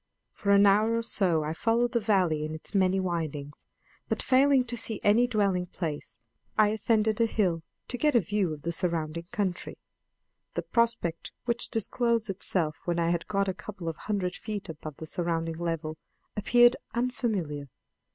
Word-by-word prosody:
For 200 Hz, -, -4 dB
an 200 Hz, 0 st, +7 dB
hour 215 Hz, +3 st, +4 dB
or 230 Hz, -, -1 dB
so 180 Hz, -8 st, +1 dB
I 155 Hz, +1 st, -2 dB
followed 235 Hz, +6 st, +1 dB
the 240 Hz, -, +2 dB
valley 185 Hz, -8 st, +2 dB
in 155 Hz, +1 st, -4 dB
its 155 Hz, -, -7 dB
many 190 Hz, -1 st, +3 dB
windings, 155 Hz, -5 st, -4 dB, 0.4 s
but, -, -, 0 dB
failing 270 Hz, 0 st, +4 dB
to 240 Hz, 0 st, -4 dB
see 225 Hz, -2 st, -3 dB
any 225 Hz, +4 st, +5 dB
dwelling 200 Hz, -6 st, +1 dB
place, 160 Hz, -5 st, -5 dB, 0.4 s
I 215 Hz, -1 st, +5 dB
ascended 220 Hz, 0 st, +1 dB
a 230 Hz, -, +4 dB
hill 180 Hz, -7 st, +1 dB, 0.3 s
to 245 Hz, -, -4 dB
get 300 Hz, -3 st, +3 dB
a -, -, +8 dB
view 200 Hz, -2 st, 0 dB
of 150 Hz, -2 st, -7 dB
the 170 Hz, -, -1 dB
surrounding 170 Hz, -2 st, -2 dB
country. 200 Hz, -6 st, -2 dB, 0.8 s
The -, -, -1 dB
prospect 230 Hz, -8 st, 0 dB
which 235 Hz, 0 st, -1 dB
disclosed 230 Hz, 0 st, 0 dB
itself 170 Hz, -5 st, 0 dB
when 175 Hz, -1 st, 0 dB
I 170 Hz, 0 st, +2 dB
had 170 Hz, -1 st, -1 dB
got 200 Hz, -1 st, 0 dB
a 190 Hz, -, 0 dB
couple 190 Hz, -2 st, -8 dB
of 165 Hz, -, -3 dB
hundred 195 Hz, -4 st, -2 dB
feet 205 Hz, -2 st, -6 dB
above 155 Hz, -2 st, -7 dB
the 160 Hz, -, -7 dB
surrounding 165 Hz, 0 st, -2 dB
level, 165 Hz, -2 st, -3 dB, 0.4 s
appeared 240 Hz, +3 st, +5 dB, 0.2 s
unfamiliar. 210 Hz, -, -1 dB
195 Hz, 170 wpm, -28 LUFS, 165-225 Hz, 0.8 s, a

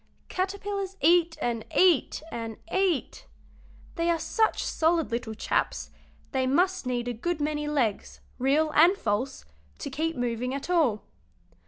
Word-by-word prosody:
Caterpillars 390 Hz, 0 st, -3 dB
eat 335 Hz, +2 st, +4 dB
and 230 Hz, -2 st, -1 dB
eat 350 Hz, -4 st, +4 dB
and 225 Hz, -2 st, -5 dB, 0.2 s
eat; 375 Hz, -6 st, 0 dB, 0.7 s
they 335 Hz, +1 st, +1 dB
are 340 Hz, -, +3 dB
such 440 Hz, +7 st, +1 dB
solid 325 Hz, -3 st, +1 dB
little 230 Hz, -1 st, -3 dB
chaps -, -, -1 dB, 0.4 s
they 260 Hz, -1 st, 0 dB
must 360 Hz, +2 st, +1 dB
need 245 Hz, -1 st, -1 dB
a 245 Hz, -, -1 dB
good 335 Hz, +8 st, -2 dB
many 295 Hz, 0 st, -1 dB
legs, 255 Hz, -9 st, -1 dB, 0.2 s
real 295 Hz, +5 st, +2 dB
and 340 Hz, +6 st, +5 dB
false, 220 Hz, -, -2 dB, 0.3 s
to -, -, -6 dB
keep 325 Hz, +2 st, -1 dB
moving 245 Hz, +1 st, -2 dB
at 280 Hz, +6 st, -4 dB
all. 260 Hz, -, +2 dB
300 Hz, 140 wpm, -27 LUFS, 245-345 Hz, 0.7 s, and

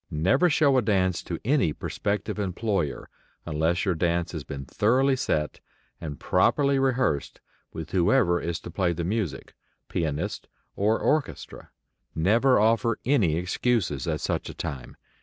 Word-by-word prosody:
Never 95 Hz, -, +2 dB
show 145 Hz, -4 st, +4 dB
a -, -, +1 dB
dance 95 Hz, -5 st, +1 dB
to 85 Hz, -, -5 dB
any 125 Hz, -, +2 dB
prospective 105 Hz, +5 st, -3 dB
employer 95 Hz, -5 st, -2 dB, 0.4 s
unless 80 Hz, +5 st, 0 dB
your 95 Hz, -, +2 dB
dance 85 Hz, 0 st, 0 dB
has 80 Hz, -4 st, -5 dB
been 70 Hz, -1 st, -7 dB
thoroughly 130 Hz, -, +2 dB
set 75 Hz, -11 st, -1 dB, 0.4 s
and 75 Hz, -4 st, -6 dB
properly 140 Hz, +9 st, +2 dB
rehearsed 130 Hz, -, 0 dB, 0.3 s
with 80 Hz, 0 st, -7 dB
whoever 85 Hz, -1 st, +3 dB
is 85 Hz, -1 st, -3 dB
to 85 Hz, -, -8 dB
play 90 Hz, -1 st, 0 dB
the 85 Hz, +1 st, -4 dB
music, 90 Hz, -, -3 dB, 0.4 s
pianist 80 Hz, +5 st, -3 dB, 0.3 s
or 105 Hz, +3 st, +2 dB
orchestra. 155 Hz, -1 st, -2 dB, 0.5 s
Never 115 Hz, +10 st, +3 dB
offer 115 Hz, +2 st, +2 dB
any 110 Hz, -, +3 dB
excuses 90 Hz, -, -1 dB
at -, -, -1 dB
such -, -, -2 dB
a -, -, -8 dB
time. 65 Hz, -4 st, -6 dB
95 Hz, 140 wpm, -26 LUFS, 80-120 Hz, 0.5 s, show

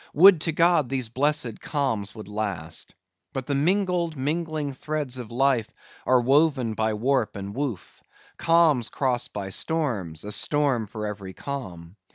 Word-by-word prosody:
Would 180 Hz, +1 st, +8 dB
to 165 Hz, -, +1 dB
God 165 Hz, -4 st, +3 dB
these 130 Hz, -4 st, -1 dB
blessed 135 Hz, -2 st, 0 dB
calms 115 Hz, -9 st, -1 dB
would 110 Hz, -3 st, -9 dB
last. 105 Hz, -4 st, -4 dB, 0.4 s
But 135 Hz, -2 st, -3 dB
the 140 Hz, -, -1 dB
mingled, 175 Hz, +1 st, +1 dB
mingling 155 Hz, +1 st, -2 dB
threads 140 Hz, -1 st, -3 dB
of 120 Hz, -3 st, -7 dB
life 125 Hz, -2 st, +2 dB, 0.4 s
are 130 Hz, -1 st, +5 dB
woven 135 Hz, -2 st, +3 dB
by 110 Hz, 0 st, 0 dB
warp 125 Hz, +1 st, 0 dB
and 100 Hz, 0 st, -6 dB
woof: 130 Hz, -6 st, -5 dB, 0.3 s
calms 165 Hz, -8 st, +3 dB
crossed 125 Hz, -3 st, -1 dB
by 100 Hz, -1 st, -5 dB
storms, 105 Hz, -, -2 dB
a 105 Hz, -, -5 dB
storm 135 Hz, -3 st, +1 dB
for 110 Hz, 0 st, -5 dB
every 100 Hz, -2 st, -6 dB
calm. 95 Hz, -11 st, -7 dB
130 Hz, 150 wpm, -25 LUFS, 110-150 Hz, 0.4 s, Would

